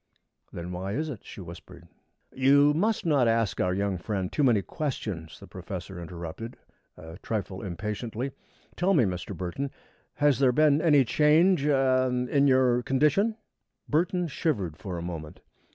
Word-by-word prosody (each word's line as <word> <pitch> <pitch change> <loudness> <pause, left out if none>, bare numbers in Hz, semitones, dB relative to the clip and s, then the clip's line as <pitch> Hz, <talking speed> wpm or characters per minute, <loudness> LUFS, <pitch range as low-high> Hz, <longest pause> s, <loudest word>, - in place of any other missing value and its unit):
"Then 85 +1 -6
why 95 +2 -4
is 155 +6 -2
it?" 120 -9 -7
she - - -10
whispered. 85 0 -12 0.5
"You 140 +2 +5
must 200 +5 0
not 140 -7 +3
ask 115 -3 +1
our 90 - +1
young 100 -1 -1
friend 95 0 -3
too - - -1
many 115 -7 +3
questions," 105 - -5
the - - -11
professor 95 -2 -7
interrupted, 85 +7 -7 0.4
a 80 +3 -11
trifle 100 -4 -4
impatiently. 105 +7 -4 0.4
"Tell 190 +2 +2
me, 140 - +5
Mr. 90 -4 -3
Burton, 95 +10 -3 0.5
has 145 -3 +2
there 135 -2 +4
been 150 +2 +3
any 145 -5 +5
change 155 +6 +4
er 130 -2 +3 0.2
in 140 +2 +3
your 130 -2 +3
condition?" 150 - +2 0.5
Burton 175 +3 +1
shivered 110 - -2
for 95 -1 -6
a 85 - -5
moment. 80 -3 -7
125 Hz, 150 wpm, -27 LUFS, 95-145 Hz, 0.5 s, You